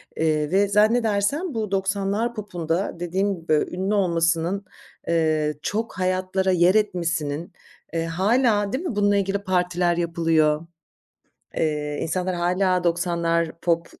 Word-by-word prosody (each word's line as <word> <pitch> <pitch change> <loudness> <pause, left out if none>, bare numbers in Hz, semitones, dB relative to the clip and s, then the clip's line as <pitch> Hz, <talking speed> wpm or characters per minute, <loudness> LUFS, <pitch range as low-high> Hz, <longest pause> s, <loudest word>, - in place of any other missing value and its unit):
eee, 155 -1 0
ve 200 +1 +3
zannedersem 220 - +2
bu 215 -3 -3
90'lar 200 +4 0
popunda, 175 -4 -3
dediğim 190 +3 -1
gibi, 165 -2 -2 0.2
ünlü 190 +3 -1
olmasının, 175 0 +1 0.4
eee, 155 -2 +1
çok 215 +5 -3
hayatlara 185 +1 0
yer 180 +2 +4
etmesinin, 170 -6 -1 0.4
eee, 165 0 -1
hâlâ, 205 +4 +1
değil 290 +7 -2
mi, 270 - -3
bununla 205 0 +3
ilgili 200 0 0
partiler 180 -2 0
yapılıyor, 165 -2 +1 1.3
insanlar 180 +2 -1
hâlâ 180 +1 +1
90'lar 170 -1 0
pop, 170 -1 +1
185 Hz, 115 wpm, -23 LUFS, 170-200 Hz, 1.3 s, yer